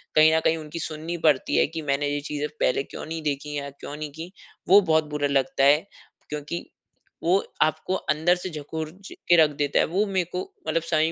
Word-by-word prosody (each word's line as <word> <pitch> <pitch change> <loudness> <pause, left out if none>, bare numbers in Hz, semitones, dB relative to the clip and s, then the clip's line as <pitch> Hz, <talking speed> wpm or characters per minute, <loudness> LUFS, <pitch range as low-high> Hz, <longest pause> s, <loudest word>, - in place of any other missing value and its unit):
कहीं 155 +1 +7
न - - +4
कहीं 160 - +3
उनकी 155 +1 -7
सुननी 160 +2 -4
पड़ती 145 -4 +3
है - - +5
कि 160 +1 -5
मैंने 145 0 0
ये 145 0 -1
चीज़ें 150 0 -2
पहले 135 - +2
क्यों - - -8
नहीं 160 +1 -5
देखी 150 0 -2
या 140 0 -4
क्यों 140 +1 -9
नहीं 150 -1 -5
की 165 +4 -8 0.4
वो 200 +2 +9
बहुत 160 -3 +3
बुरा 150 -1 0
लगता 140 +2 +1
है। 150 +6 +5 0.4
क्योंकि 150 +3 -4 0.6
वो 180 +3 +4 0.3
आपको 155 +4 -1
अंदर 170 +3 +2
से 180 +1 -5
झकोर 155 0 -5 0.2
ज - - -9 0.2
के 175 - +7
रख 150 - +3
देता 145 -1 +1
है - - +4
वो 195 +6 +1
मेरे 190 -3 0
को 180 - 0 0.3
मतलब 165 - +1
समझ 160 -2 +2
155 Hz, 215 wpm, -25 LUFS, 145-165 Hz, 0.6 s, वो